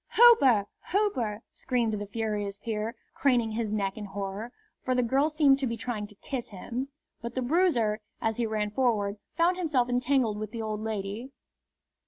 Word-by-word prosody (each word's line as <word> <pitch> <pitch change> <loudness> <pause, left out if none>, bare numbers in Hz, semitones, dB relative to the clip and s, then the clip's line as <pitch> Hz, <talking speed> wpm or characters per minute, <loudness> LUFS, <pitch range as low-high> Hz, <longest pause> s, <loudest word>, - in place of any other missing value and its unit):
"Hooper! 280 - +7 0.3
Hooper!" 250 - 0
screamed 240 -4 0
the 205 -1 -3
furious 205 -2 -2
peer, 220 +1 -3 0.2
craning 245 -5 +2
his 220 -1 -2
neck 200 -2 -1
in 210 - -5
horror, 200 +3 -5 0.3
for 255 - +1
the 250 - +3
girl 270 +6 +2
seemed 295 -3 +4
to 270 - 0
be 230 0 -3
trying 225 -3 -3
to 210 - -14
kiss 245 +4 -5
him. 235 +7 -4 0.3
But 235 0 -6
the 260 - 0
bruiser, 245 - +2 0.2
as 225 -1 -1
he 235 -2 0
ran 210 -1 -1
forward, 210 -4 +1 0.2
found 350 +2 +3
himself 290 -9 +1
entangled 245 -3 +1
with 215 -1 -4
the 230 - -3
old 215 -1 -3
lady. 215 +2 -4
230 Hz, 175 wpm, -28 LUFS, 210-260 Hz, 0.3 s, Hooper